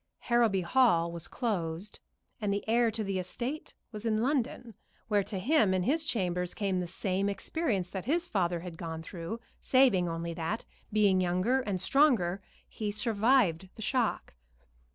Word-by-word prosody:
Harrowby 230 -5 +2
Hall 170 -5 +3
was 170 -1 -6
closed, 190 -5 -3 0.4
and 205 -1 0
the 200 +2 -2
heir 235 +1 +3
to 220 0 -2
the 195 -2 -2
estate 240 - -4 0.2
was 210 -2 -7
in 220 -1 +1
London, 250 -3 -1 0.4
where 205 -2 +3
to 195 0 -5
him 215 -2 +3
in 185 - +1
his 310 - +1
chambers 180 - -1
came 195 -3 0
the 180 - -3
same 190 +2 -1
experience 205 - -1
that 190 -2 -5
his 340 +6 0
father 175 - 0
had 175 -2 -8
gone 160 -2 -5
through, 170 +6 -6 0.2
saving 245 -10 +4
only 165 0 -3
that, 165 +7 -3 0.3
being 200 -3 +4
younger 185 +9 +2
and 200 -6 -2
stronger, 200 - +3 0.3
he 215 -2 -4
survived 210 -4 +2
the 220 - -7
shock. 245 -1 0
200 Hz, 160 wpm, -30 LUFS, 180-235 Hz, 0.4 s, saving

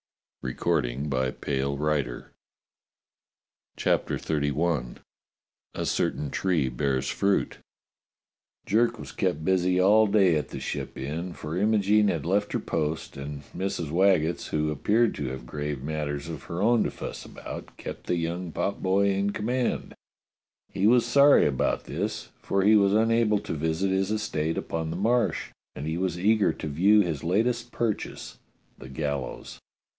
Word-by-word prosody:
B - - -2
ut - - -9
find 70 -4 0
that 65 -1 -2
mulatto! 70 -1 -1 0.7
" - - -56
CHAPTER - - +1
XXXI 75 -3 -1 0.8
A - - -2
CERTAIN 75 -2 -1
TREE 85 -8 +1
BEARS 65 +1 -1
FRUIT 100 0 0 1.1
JERK 115 +3 +2
was - - -8
kept 90 -5 -1
busy 90 -1 +2
all 105 +4 +5
day 100 -5 +4
at 75 - -1
the - - -6
Ship - - -5
Inn, 80 +7 -4
for 75 0 -6
Imogene 105 +1 +3
had 85 -6 -1
left 100 +4 0
her - - +1
post 80 +1 -3
and 70 +1 -6
Mrs. 95 -5 -3
Waggetts, 85 -2 +2
who 75 0 0
appeared 110 - +2
to 70 - -4
have 65 -1 -6
grave 75 0 -4
matters 75 -1 -3
of 80 -5 -7
her 85 +3 -3
own 120 +1 +4
to - - 0
fuss - - -7
about, - - -9
kept - - -8
the - - +1
young 85 +1 -3
potboy 100 +2 +1
in 100 +1 0
command. 120 +4 -1 0.8
He 100 - +2
was 120 +1 +5
sorry 140 +4 +6
about 70 -3 0
this, - - -4
for 100 -1 0
he 105 +2 +6
was 100 -1 +4
unable 115 -1 +3
to - - -5
visit 80 +5 0
his 95 +1 +1
estate 105 -8 -1
upon 80 -1 -3
the 80 - -3
Marsh, 120 +5 +1 0.2
and 70 - -5
he 80 +2 -2
was 90 -2 -1
eager 105 +2 +3
to - - -6
view 95 +8 +4
his 85 -7 -2
latest 115 +7 0
purchase, 115 -3 -3 0.4
the 65 - -10
gallows. 70 -1 -4
85 Hz, 155 wpm, -27 LUFS, 75-105 Hz, 1.1 s, sorry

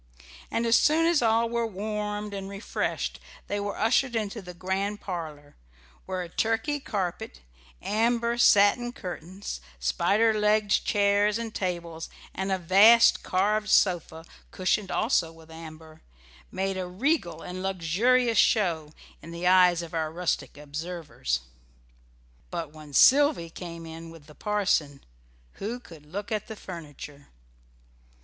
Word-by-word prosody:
And 230 - -1
as 230 0 +5
soon 320 +2 +3
as 335 -4 +3
all 230 0 +3
were 235 0 -1
warmed 210 0 -4
and 195 -1 -5
refreshed 200 +2 -3 0.3
they 205 - -3
were 205 0 -4
ushered 240 +3 +2
into 220 0 -2
the 180 -1 -10
great 190 +3 -2
parlour, 155 -7 -7 0.5
where 185 -1 -3
a - - -7
Turkey 225 - 0
carpet, 180 - -4 0.4
amber 235 +2 +1
satin 235 +2 +5
curtains, 185 0 -7 0.2
spider 200 - +2
legged 210 -1 +2
chairs 205 +1 +2
and 230 -1 -5
tables, 170 -3 -4 0.2
and 190 +1 -3
a 190 - +2
vast 200 +7 +6
carved 210 +3 0
sofa, 170 -5 +2 0.2
cushioned 190 +1 0
also 185 -8 +1
with 165 0 -16
amber, 160 -1 -11 0.5
made 195 0 -2
a 185 - -3
regal 220 - -1
and 180 +1 -6
luxurious 200 +6 +2
show 165 -8 +2 0.3
in 165 - -11
the 170 +1 -6
eyes 180 -2 +5
of 170 - -10
our 160 -1 -1
rustic 175 -3 -2
observers. 150 - -4 1.1
But 165 -4 -5
when 155 -2 -12
Sylvy 270 - +5
came 170 -1 -8
in 165 +1 -9
with 165 -3 -14
the 150 - -15
parson, 185 -9 0 0.6
who 230 +5 -3
could 160 -10 -15
look 205 +7 -6
at 215 -1 -2
furniture? 145 -6 -10
190 Hz, 135 wpm, -27 LUFS, 165-215 Hz, 1.1 s, vast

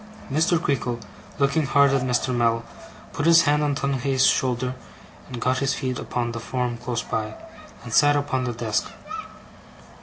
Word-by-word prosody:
Mr. 160 +4 +2
Creakle, 125 -6 -1 0.4
looking 140 +1 +1
hard 140 -1 +4
at 135 -1 +2
Mr. 125 0 0
Mell, 115 -1 +2 0.5
put 145 - -1
his 165 0 +7
hand 150 0 +2
on 145 -1 +1
Tungay's 135 -1 +1
shoulder, 125 0 +1 0.5
and 125 - -6
got 130 +2 +1
his 140 -1 0
feet 130 -1 -3
upon 120 -1 -2
the 115 - -5
form 120 +2 -2
close 120 0 -3
by, 110 -1 -3 0.5
and 120 -2 -7
sat 145 +3 +5
upon 135 -3 -1
the 120 - -2
desk. 115 - -1
130 Hz, 160 wpm, -24 LUFS, 120-140 Hz, 0.5 s, his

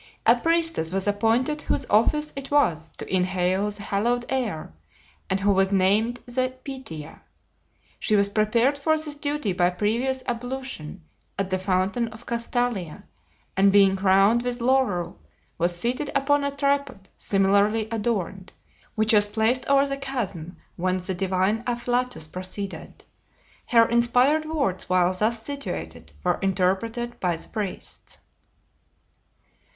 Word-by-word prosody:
A - - +7
priestess 330 - +1
was 195 0 0
appointed 230 +8 +1
whose 275 - -1
office 300 +9 +2
it 275 0 -5
was 165 - +1
to - - -4
inhale 185 +2 +1
the 205 0 -8
hallowed 240 +5 0
air, 225 - -2 0.6
and 190 - +1
who 200 +1 +3
was 195 0 +2
named 210 +5 +2
the 255 +1 -2
Pythia. 215 - -8 0.8
She 215 - +1
was 200 -1 +3
prepared 230 +7 +2
for 315 +2 +2
this 305 -1 -3
duty 290 -7 -2
by 175 0 +3
previous 235 +8 -1
ablution 245 -9 -5 0.3
at 195 -1 -2
the 185 - +1
fountain 190 +5 0
of 220 +1 -12
Castalia, 235 -7 -2 0.5
and 195 +1 +5
being 195 -1 +5
crowned 195 +4 +4
with 245 0 -3
laurel 240 - +1 0.4
was 175 +1 +1
seated 250 +7 -1
upon 285 +1 +2
a 280 - +1
tripod 280 -7 -1
similarly 200 +2 +2
adorned, 205 -4 -2 0.4
which 220 +1 +2
was 205 -1 +5
placed 220 +4 +1
over 275 0 +4
the 275 0 -3
chasm 200 - -5 0.2
whence 185 +1 -1
the 190 - -2
divine 190 +4 0
afflatus 245 -5 -1
proceeded. 185 +4 -6 0.6
Her 230 -2 +5
inspired 245 +6 +3
words 275 - -1
while 185 0 +3
thus 220 +4 0
situated 80 - -6
were - - +1
interpreted 195 +5 -1
by 175 -2 0
the 165 - -9
priests. 210 -4 -6
220 Hz, 135 wpm, -25 LUFS, 190-255 Hz, 0.8 s, A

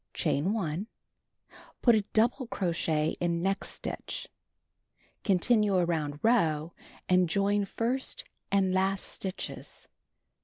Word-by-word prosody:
Chain 155 +8 +1
1. 190 -2 -2 1.0
Put 240 - +7
1 215 -2 +3
double 240 +3 +2
crochet 165 -6 0
in 170 -1 0
next 195 +1 0
stitch. - - -5 1.0
Continue 205 +1 +3
around 160 -5 0
row 165 -9 +2 0.3
and 180 -1 +4
join 200 +3 +2
first 260 - -2 0.3
and 195 -2 +3
last 190 +1 +1
stitches. 190 0 -6
190 Hz, 105 wpm, -29 LUFS, 170-215 Hz, 1.0 s, Put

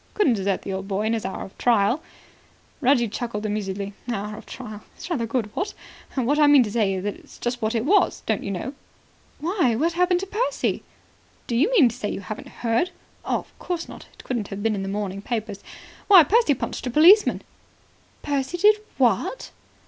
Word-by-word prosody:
Couldn't 355 - +3
desert 195 -2 -1
the 195 - -4
old 190 +1 -4
boy 200 +1 -1
in 220 +1 +1
his 225 - -2
hour 190 - -4
of 195 - -14
trial." 235 +4 +3 0.8
Reggie 255 -3 +3
chuckled 220 -1 -4
amusedly. 200 -1 -3 0.2
"'Hour 210 -2 -3
of - - -12
trial,' 215 -1 -8 0.2
is - - -8
rather 235 -9 -1
good, 225 -3 -2
what? 385 +3 -3 0.4
What 270 +3 +1
I 300 - +6
mean 290 -3 +7
to 210 - -5
say 205 -4 +1
is, 185 - -4
that's 205 0 -7
just 245 0 -3
what 220 +2 0
it 225 +1 0
was, 405 +7 +3
don't - - 0
you - - -5
know." 200 +8 -4 0.6
"Why, 320 - +1
what 325 +8 +1
happened 360 +1 +2
to - - -3
Percy?" 430 +6 -1 0.6
"Do 235 - -2
you 290 - +3
mean 405 - +6
to 235 - -4
say 215 -5 -3
you - - -4
haven't 205 +3 -7
heard? 235 +9 0 0.3
Of - - -3
course 350 -2 -3
not. - - -11
It - - -15
wouldn't 235 -6 -2
have 200 +1 -6
been 225 -1 +2
in 200 - -3
the 195 - -4
morning 200 -1 -3
papers. 215 -3 -4 0.5
Why, 380 -5 +9
Percy 400 - +3
punched 255 - -4
a - - 0
policeman." 340 - +6 0.8
"Percy 285 +3 -1
did 420 +4 +5 0.2
what?" - - +1
235 Hz, 200 wpm, -24 LUFS, 205-305 Hz, 0.8 s, Why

